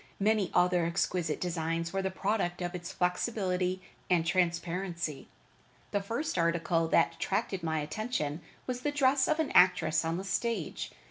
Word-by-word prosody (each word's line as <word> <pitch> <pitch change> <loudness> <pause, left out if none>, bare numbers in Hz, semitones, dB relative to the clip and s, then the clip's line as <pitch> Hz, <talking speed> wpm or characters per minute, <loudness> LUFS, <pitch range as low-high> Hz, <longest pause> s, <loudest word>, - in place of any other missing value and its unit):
Many 210 -1 +2
other 180 -1 +4
exquisite 170 -2 0
designs 165 -1 -2
were 195 - 0
the 190 - -1
product 190 -2 -1
of 175 +1 -3
its 175 -1 -6
flexibility 185 -1 0 0.3
and 175 -3 +3
transparency. 170 -2 -1 0.6
The 205 - +1
first 230 - -2
article 170 0 +1
that 165 - +3
attracted 195 +1 -1
my 160 -2 -1
attention 155 -2 -3 0.2
was 250 -1 -3
the 295 - 0
dress 270 -2 +3
of 310 +1 +1
an 315 - 0
actress 180 -3 +5
on 165 +1 -1
the 190 - -4
stage. 200 -2 -2
180 Hz, 150 wpm, -30 LUFS, 170-200 Hz, 0.6 s, actress